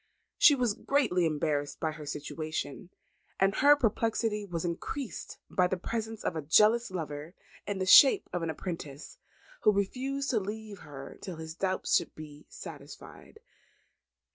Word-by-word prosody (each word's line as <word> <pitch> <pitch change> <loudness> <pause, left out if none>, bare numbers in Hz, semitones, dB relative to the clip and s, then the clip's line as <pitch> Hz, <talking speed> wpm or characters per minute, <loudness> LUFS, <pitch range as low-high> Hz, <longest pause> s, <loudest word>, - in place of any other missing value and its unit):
She 295 - +8
was 245 -5 +1
greatly 210 - +1
embarrassed 145 -2 -1
by 160 - -1
her 150 -1 -9
situation; 155 +2 -5 0.5
and 195 +1 +3
her 290 +2 +7
perplexity 225 -4 0
was 170 -2 -3
increased 210 +9 -5
by 180 -1 +2
the 185 - -2
presence 225 +3 -4
of - - -1
a 160 - -2
jealous 215 +10 +4
lover 155 -2 -6 0.3
in 205 -1 -2
the 185 - -1
shape 275 - +8
of 175 - -1
an 165 - -2
apprentice, 155 -3 -6 0.4
who 215 - +5
refused 265 +8 -1
to 230 - +2
leave 210 0 -6
her 135 -2 -10
till 185 - -6
his 160 0 -7
doubts 185 +2 0
should - - -5
be 150 -1 -11
satisfied. 440 - -11
185 Hz, 150 wpm, -30 LUFS, 155-225 Hz, 0.5 s, She